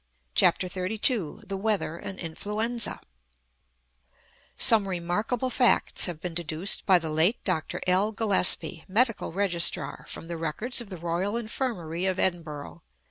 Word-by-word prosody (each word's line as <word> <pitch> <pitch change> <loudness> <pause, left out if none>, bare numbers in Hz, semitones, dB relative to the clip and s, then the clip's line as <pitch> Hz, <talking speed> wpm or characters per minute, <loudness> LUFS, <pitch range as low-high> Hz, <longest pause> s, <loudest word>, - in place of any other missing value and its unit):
CHAPTER 185 - +3
XXXII 195 - -1
THE 195 -1 -5
WEATHER 205 -5 -1
AND 195 - -8
INFLUENZA 210 +7 -2 1.6
Some 215 -4 +4
remarkable 210 +8 -2
facts 245 -2 +3
have 175 -4 -6
been 175 +1 -6
deduced 165 +2 +1
by 190 -2 +6
the 160 -2 -4
late 165 +9 +3
Dr. 160 -5 -2
L. 190 +4 +2
Gillespie, 195 -5 +3
Medical 230 +1 0
Registrar, 180 -2 +2
from 165 - -8
the 170 0 -5
records 215 +11 -2
of 230 - -10
the 185 - -7
Royal 175 +6 -2
Infirmary 200 - -3
of 185 -1 -1
Edinburgh. 150 - -3
185 Hz, 135 wpm, -26 LUFS, 170-215 Hz, 1.6 s, by